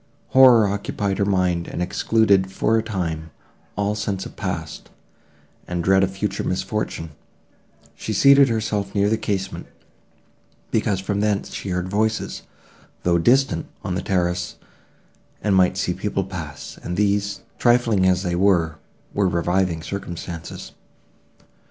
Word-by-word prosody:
Horror 125 -5 +7
occupied 100 0 -2
her 100 - +2
mind, 90 -3 +1
and - - -5
excluded, 95 +1 +2
for 110 +3 +1
a 110 - +3
time, 85 -7 -3 0.5
all 105 +1 0
sense 100 -2 -3
of - - -10
past, 80 -6 -5 0.8
and 90 -1 -2
dread 95 +2 +4
of 95 - +2
future 95 0 -3
misfortune: 80 -1 -3 0.8
she - - -6
seated 140 +5 +6
herself 105 -3 -2
near 100 0 +3
the 110 - +2
casement, 95 -3 -3 1.0
because 95 -2 +1
from 100 +1 -2
thence 105 -1 0
she 100 - -5
heard 90 0 -1
voices, 110 +3 -1 0.6
though 85 -1 +3
distant, 130 +9 +2 0.2
on 95 -4 -2
the 90 - -1
terrace, 90 -2 -1 0.9
and 105 - +2
might 95 0 +3
see 95 -2 0
people 100 +1 -2
pass, 85 -6 -8
and 90 0 -4
these, 100 -1 0 0.2
trifling 120 -6 +3
as 90 0 +2
they 90 -2 -1
were, 85 -4 +2 0.4
were 100 -2 +2
reviving 85 -1 0
circumstances. 85 -3 -6
95 Hz, 135 wpm, -22 LUFS, 90-105 Hz, 1.0 s, Horror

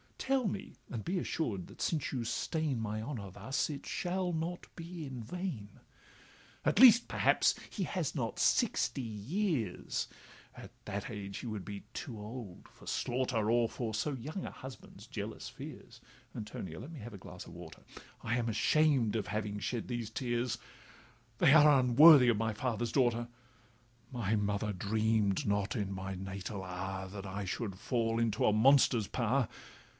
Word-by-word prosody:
Tell 265 -3 +1
me—and 155 - -6
be 180 +1 -1
assured, 115 - -2
that - - -12
since 155 -5 0
you 125 -4 -2
stain 145 +3 -1
My 110 -1 -2
honour 110 -6 -5
thus, 135 - -1
it 145 -2 -6
shall 180 0 -1
not 170 +2 -3
be 170 -1 -7
in 130 -3 -6
vain. 120 - -5 0.9
'At - - +3
least, 240 -1 +9
perhaps, - - +3 0.2
he - - -3
has - - -2
not - - -2
sixty 135 - +2
years, 120 - -2 0.5
At - - -10
that 100 -1 -4
age 100 -2 -5
he - - -6
would 105 -5 -4
be 100 +1 -6
too 120 -7 -6
old 105 -3 -8
for - - -17
slaughter, 120 -3 0
Or 120 -1 +4
for 115 -1 -4
so 140 +7 -1
young 150 +9 -5
a - - -5
husband's 130 0 -11
jealous - - -6
fears - - -10 0.4
(Antonia! 95 -6 -6
let 140 - -8
me 160 - -8
have 115 0 -8
a - - -7
glass - - -9
of - - -11
water). 85 -2 -10 0.4
I 115 +2 0
am 120 -1 -1
ashamed 125 0 +3
of 110 -3 -1
having 105 +1 -2
shed 115 +2 -3
these 120 -3 -3
tears, 120 0 -1 0.8
They 135 - +6
are 150 -3 +8
unworthy 130 +1 +8
of 115 - +3
my 110 0 0
father's 120 0 -2
daughter; 120 -3 +2 0.8
My 115 -4 0
mother 105 0 0
dream'd 105 +1 +1
not 100 0 0
in 100 -4 -2
my 95 0 -4
natal 95 +1 -5
hour 95 +1 -4
That 100 +1 -7
I 100 +1 -4
should 95 0 -3
fall 115 +1 0
into 115 -3 +1
a 105 - +4
monster's 120 -2 +5
power. 125 +1 +1
115 Hz, 165 wpm, -33 LUFS, 105-135 Hz, 0.9 s, least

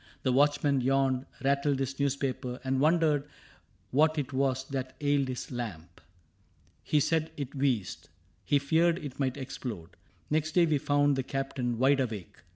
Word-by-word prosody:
The 130 - +2
watchman 145 0 +3
yawned, 135 0 +1 0.2
rattled 140 +1 +2
his 135 0 -3
newspaper. 135 -2 -1
And 130 0 0
wondered 150 -1 +2 0.6
what 155 +4 +3
it 140 -2 -2
was 130 -1 0
that 130 -1 -4
ailed 145 -2 +1
his 130 +1 -5
lamp. 90 -9 -6 0.8
He 150 - +2
said 160 +2 +1
it 140 -3 -5
wheezed. 130 - -1 0.3
He 145 - +3
feared 160 +4 +2
it 145 -6 -8
might 130 -1 0
explode. 120 -10 -6 0.4
Next 155 0 0
day 175 0 +5
we 155 -3 +1
found 145 0 +2
the - - +1
Captain 130 -2 -3
wide 135 +3 +4
awake. 110 -8 -4
135 Hz, 155 wpm, -29 LUFS, 130-145 Hz, 0.8 s, day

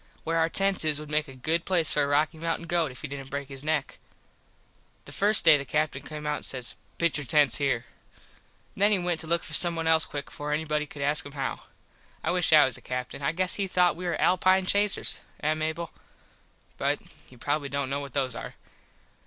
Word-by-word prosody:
Where 165 +1 0
our 165 0 +2
tents 195 +1 +1
is 155 -2 +3
would 150 0 -9
make 155 +1 0
a 135 - -10
good 160 +6 -1
place 170 -5 +3
for 150 - +2
a 140 - +2
Rocky 150 +2 +1
Mountin 165 +1 -2
goat 170 -2 0
if 125 +2 -11
he - - -3
didnt 135 -1 -7
break 140 0 -5
his 135 0 -7
neck. 155 -2 -1 1.1
The - - -10
first 210 +2 +3
day 155 -2 +8
the 140 - -4
Captin 150 -1 -1
came 150 +2 -8
out 150 0 0
an - - -9
says 125 -2 -3 0.2
"Pitch 170 -3 +1
your 145 - -6
tents 145 +2 +4
here." 135 -5 0 0.9
Then 205 +2 +3
he 205 - +4
went 175 -2 -1
to 160 - -3
look 170 +1 +2
for 155 - -9
someone 165 0 +2 0.2
quick 145 -1 -4
before 150 0 -5
anyone 150 -1 -1
could 140 -1 -7
ask 145 +2 +1
him 145 - -11
how. 135 -2 -4 0.6
I - - 0
wish 180 -1 0
I 155 -2 +8
was 130 -2 -2
a - - -15
Captin. 125 +2 -5
I 140 - +1
guess 185 +2 +1
he 200 -1 -1
thought 180 -1 +3
we 180 +1 -5
was 175 - -1
Alpine 185 +1 +3
Chasers. 205 +1 +2 0.2
Eh, 155 +1 +1
Mable? 160 +1 -3 0.9
But - - +1 0.3
you 125 - -16
probably 145 +3 -2
dont 140 -1 -2
know 140 - -1
what 140 -3 -8
those 130 -3 0
are. - - -7
155 Hz, 220 wpm, -27 LUFS, 140-170 Hz, 1.1 s, day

